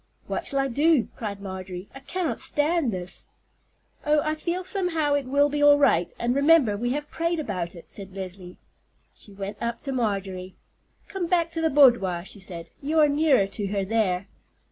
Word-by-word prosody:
"What - - -3
shall 275 - -1
I 275 0 +2
do?" 290 0 +2
cried 205 -3 -5
Marjorie. 185 -1 -7
"I 270 - -9
cannot 280 -2 -3
stand 295 -3 +1
this." 180 -2 -6 0.8
"Oh, 300 0 +3
I 310 - 0
feel 345 +4 -3
somehow 345 -6 +1
it 285 -2 0
will 285 +2 +3
be 290 0 -2
all 290 0 +7
right; 175 -12 +3
and 240 +1 0
remember 280 -5 +4
we 240 +4 -2
have 295 +1 -5
prayed 335 0 -1
about 185 - -4
it," 170 - -12
said 195 -2 -8
Leslie. 185 -1 -7 0.6
She 205 - -15
went 200 +1 -7
up 235 0 -2
to 275 - -4
Marjorie. 195 -6 -2 0.5
"Come 380 -3 -3
back 335 -1 +1
to 325 - -3
the 320 - +2
boudoir," 235 - +4
she 200 - -8
said. 175 -3 -7
"You 300 +3 -1
are 300 - +6
nearer 290 -7 +3
to 200 +1 -4
her 200 -1 -1
there." 200 -3 0
245 Hz, 190 wpm, -25 LUFS, 195-300 Hz, 0.8 s, all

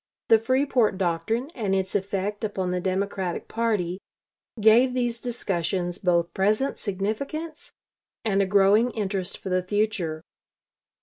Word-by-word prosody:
The 225 - +7
Freeport 255 -3 +2
doctrine 220 - -1
and 200 -5 -1
its 190 -1 -1
effect 200 +1 -2
upon 190 -4 -2
the 180 - 0
Democratic 190 -1 -2
party 210 -6 -1 0.6
gave 230 +4 +5
these 240 -2 -1
discussions 185 -6 -2
both 170 -2 +1
present 215 +8 +1
significance 275 - -4 0.5
and 200 -2 +2
a 195 - +1
growing 205 +4 +4
interest 195 -3 -3
for 190 - -7
the 185 0 +2
future. 185 -5 -1
200 Hz, 125 wpm, -25 LUFS, 185-230 Hz, 0.6 s, The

